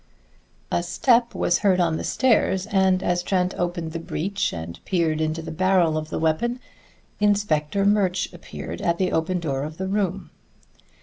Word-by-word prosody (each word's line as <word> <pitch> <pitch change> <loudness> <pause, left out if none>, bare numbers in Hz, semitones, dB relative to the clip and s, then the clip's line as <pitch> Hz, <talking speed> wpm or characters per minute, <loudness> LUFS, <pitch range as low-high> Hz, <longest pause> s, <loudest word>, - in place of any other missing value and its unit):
A - - +1
step 235 +7 +2
was 175 - +2
heard 190 -3 +3
on 165 -2 +2
the - - -4
stairs, 210 -7 +2
and 190 -3 +2
as 175 0 +1
Trent 180 0 0
opened 175 -2 -3
the 165 - -4
breech 195 +4 -2
and 85 +1 -7
peered 160 -4 0
into 160 +1 -1
the 160 - -6
barrel 180 -1 +2
of 155 0 -3
the - - -3
weapon, 165 +11 0 0.6
Inspector 200 -3 +1
Murch 190 -3 +1
appeared 85 - -8
at 170 0 +1
the 185 0 0
open 170 +3 0
door 140 -5 -2
of 155 +2 -6
the 190 - -3
room. 195 -2 -2
175 Hz, 170 wpm, -24 LUFS, 160-195 Hz, 0.6 s, heard